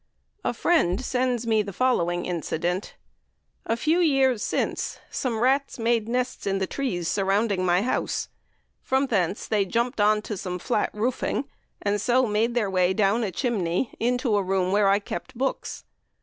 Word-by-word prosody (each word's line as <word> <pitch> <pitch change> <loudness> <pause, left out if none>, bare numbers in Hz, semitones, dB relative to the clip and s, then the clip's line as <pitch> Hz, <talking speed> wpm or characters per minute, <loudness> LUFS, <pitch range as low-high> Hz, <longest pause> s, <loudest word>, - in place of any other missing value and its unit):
A - - +1
friend 200 - +2
sends 250 -2 0
me 220 -2 +3
the 200 -1 -5
following 175 -7 +1
incident: 175 +2 -2 0.7
"A 225 - +1
few 315 +8 +2
years 270 -8 +3
since, - - -2
some 235 -4 -2
rats 275 +3 +2
made 230 -1 +1
nests 250 -2 -2
in 195 0 +1
the 190 - 0
trees 185 -9 -2
surrounding 195 +2 +1
my 180 +1 +3
house; 255 - -1 0.5
from 265 +1 +1
thence 195 -6 0
they 210 -2 +2
jumped 235 +4 -1
on 210 0 +3
to 210 - -4
some 180 -1 -4
flat 210 +4 0
roofing, 250 +5 -1 0.4
and 205 0 0
so 250 +3 +3
made 225 +2 0
their 225 -4 +2
way 185 -1 +2
down 215 +2 +2
a 210 - -1
chimney 195 -1 -1
into 245 -1 +1
a 205 - +3
room 185 -1 0
where 205 0 +3
I 200 - +5
kept 205 +3 -6
books. 265 +2 -3
215 Hz, 165 wpm, -25 LUFS, 190-250 Hz, 0.7 s, I